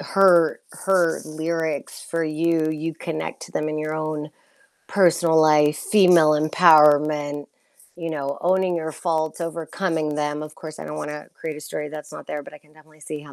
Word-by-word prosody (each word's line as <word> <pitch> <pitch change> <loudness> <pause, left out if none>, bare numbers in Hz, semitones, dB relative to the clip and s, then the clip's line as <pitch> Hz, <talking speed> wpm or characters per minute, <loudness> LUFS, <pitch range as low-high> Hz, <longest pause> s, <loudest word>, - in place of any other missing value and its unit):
her 180 -4 +4 0.3
her 180 -4 +2
lyrics 160 -1 -3
for 165 -1 -1
you, 160 0 0
you 155 +1 -4
connect 160 -1 -5
to - - -11
them 155 0 -2
in 155 0 -3
your 155 0 -3
own 155 -1 -4 0.6
personal 170 -4 +3
life, 150 -1 +4
female 180 -6 +5
empowerment, 150 -2 +4 0.5
you 165 -1 -5
know, 140 -3 -4
owning 185 0 +1
your 160 -1 -4
faults, 160 -1 -2
overcoming 165 -1 -3
them, 150 0 -2
of 155 0 -9
course, 155 -1 -10
I - - -7
don't 150 - -6
wanna 150 0 -6
create 155 -2 -6
a - - -9
story 150 0 -5
that's 150 0 -9
not - - -10
there, 150 - -5
but 150 - -13
I - - -12
can 150 0 -27
definitely 155 0 -22
see 150 0 -7
how 145 -1 -14
155 Hz, 180 wpm, -22 LUFS, 150-165 Hz, 0.6 s, female